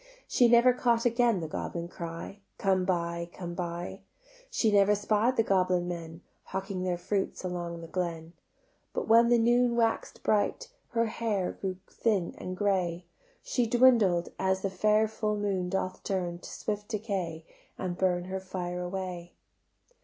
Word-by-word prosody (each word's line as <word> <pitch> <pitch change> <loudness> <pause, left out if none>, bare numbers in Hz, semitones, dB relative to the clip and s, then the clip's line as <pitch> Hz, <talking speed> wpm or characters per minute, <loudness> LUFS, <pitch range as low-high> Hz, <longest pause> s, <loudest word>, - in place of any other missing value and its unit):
She 245 - +4
never 240 +1 +6
caught 235 -1 +1
again 235 -4 +3
the 160 - -3
goblin 170 +2 -4
cry: 170 +3 -7 0.2
"Come 190 -2 +2
buy, 170 -2 -1
come 175 -2 -6
buy;" 175 0 -4 0.5
She 220 - +2
never 205 0 +5
spied 215 +4 +1
the 225 - +5
goblin 185 -3 +2
men 165 -1 -6 0.2
Hawking 190 -1 -4
their 180 -1 0
fruits 195 +2 -2
along 175 -2 -4
the 165 - -8
glen: 170 -2 -3 0.6
But - - -2
when 230 +1 +6
the 240 - +5
noon 240 +1 +3
wax'd 230 -1 0
bright 345 - +1 0.2
Her 230 0 +2
hair 215 -4 -1
grew 190 -2 -4
thin 205 -7 0
and 185 0 -5
grey; 180 -4 0 0.4
She 250 - 0
dwindled, 230 -8 +4
as 190 0 +1
the 195 - 0
fair 215 +3 +3
full 215 -1 -2
moon 195 -3 -1
doth 185 0 -2
turn 175 -3 -2
To - - -10
swift 210 -1 -4
decay 195 -7 -3 0.3
and 180 -1 -3
burn 180 -1 +1
Her 190 +1 -3
fire 180 -1 -4
away. 180 -1 -5
190 Hz, 155 wpm, -29 LUFS, 175-220 Hz, 0.6 s, never